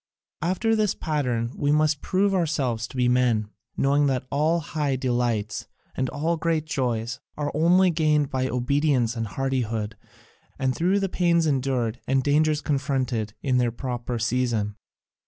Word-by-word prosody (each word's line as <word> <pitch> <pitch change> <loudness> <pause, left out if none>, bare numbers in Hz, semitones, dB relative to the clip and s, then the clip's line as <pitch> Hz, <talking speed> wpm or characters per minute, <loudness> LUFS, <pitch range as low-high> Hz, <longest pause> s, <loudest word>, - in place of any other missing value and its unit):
After 205 +6 +1
this 210 -2 +1
pattern 125 -7 -1
must 150 +1 +2
we - - -35
prove 195 +1 +1
ourselves 140 -10 0
to 130 - -10
be 125 -1 +3
men, 120 -4 +2 0.3
knowing 140 +1 +3
that 130 -2 -1
all 155 +4 +2
high 150 -3 -1
delights 120 -4 -1 0.3
and 130 -1 -1
all 160 +4 -1
great 160 -1 0
joys 125 -5 -2 0.2
are 145 -1 -2
only 180 +4 +4
gained 155 -3 +2
by 130 -1 0
obedience 125 -1 +1
and 115 -1 -2
hardihood, 115 -4 -2 0.6
and 130 -1 0
through 185 +6 +2
pains 170 -2 +2
endured 130 -5 0
and 135 0 +2
dangers 150 +2 +2
confronted 130 -7 -1
in 130 -3 +2
their 120 -1 +1
proper 120 0 -4
season." 115 -3 0
135 Hz, 145 wpm, -25 LUFS, 120-155 Hz, 0.6 s, only